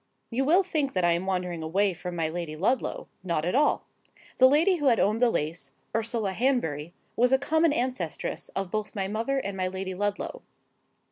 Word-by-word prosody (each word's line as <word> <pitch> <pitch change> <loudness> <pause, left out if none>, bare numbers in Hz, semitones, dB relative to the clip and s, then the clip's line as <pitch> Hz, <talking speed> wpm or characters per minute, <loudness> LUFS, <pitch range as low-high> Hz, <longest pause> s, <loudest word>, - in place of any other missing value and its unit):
You 260 +3 0
will 350 +7 +5
think 310 -7 -1
that 185 -2 +1
I 175 - +4
am 170 +3 0
wandering 180 -3 -2
away 190 +5 +1
from 175 0 -6
my 165 -2 0
Lady 160 -1 -4
Ludlow. 215 +11 -1 0.2
Not 170 -4 -1
at 180 - 0
all. 290 +3 +2 0.5
The 260 0 +8
Lady 330 +7 +4
who 295 -3 0
had 235 -3 +4
owned 215 +3 +2
the 245 - +5
lace, 160 -4 -3 0.2
Ursula 225 -2 0
Hanbury, 180 - 0 0.2
was 245 +2 +3
a 265 - +6
common 315 +3 +2
ancestress 245 - -2
of 195 -2 -3
both 215 0 -3
my 195 -2 -1
mother 225 +7 -1
and 200 -7 -3
my 185 -1 -1
Lady 190 0 -4
Ludlow. 205 - -3
205 Hz, 195 wpm, -27 LUFS, 180-260 Hz, 0.5 s, The